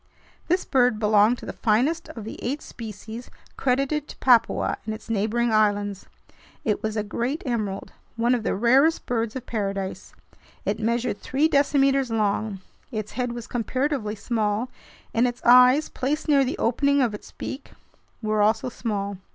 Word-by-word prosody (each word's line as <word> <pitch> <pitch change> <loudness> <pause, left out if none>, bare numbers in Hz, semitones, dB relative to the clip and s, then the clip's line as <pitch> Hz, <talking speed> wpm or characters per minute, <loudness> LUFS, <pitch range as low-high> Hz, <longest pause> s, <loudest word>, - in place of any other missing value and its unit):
This 360 +2 +1
bird 250 -4 +3
belonged 215 +2 +4
to - - -10
the - - -5
finest 260 +10 +1
of 225 - -8
the 220 - -8
eight 275 +5 -2
species 225 +1 -8 0.3
credited 275 +3 0
to - - -11
Papua 240 -3 +3
and 220 -1 -4
its 225 - -9
neighboring 225 +3 +1
islands. 205 -2 +1 0.6
It 210 - 0
was 220 0 -2
a 210 - 0
"great 240 +8 -3
emerald," 215 -6 -3 0.2
one 235 +2 +2
of 245 - +1
the - - -1
rarest 265 +10 +3
birds 230 -1 -1
of 255 -1 -5
paradise. 195 -3 -4 0.5
It - - -1
measured 235 -1 -1
three 280 +4 +2
decimeters 275 -3 +3
long. 210 -2 -1 0.3
Its 215 -3 -4
head 245 0 -2
was 240 -1 -6
comparatively 250 -2 -1
small, 220 +2 -1 0.4
and 235 +2 +3
its 245 0 -5
eyes, 250 +5 +7
placed 295 +5 -2
near 280 -2 +5
the 265 - -2
opening 280 +4 +2
of 235 -4 0
its 210 - -9
beak, 270 +1 -7 0.5
were 215 0 +1
also 215 +4 +2
small. 200 -4 -3
235 Hz, 160 wpm, -24 LUFS, 215-260 Hz, 0.6 s, eyes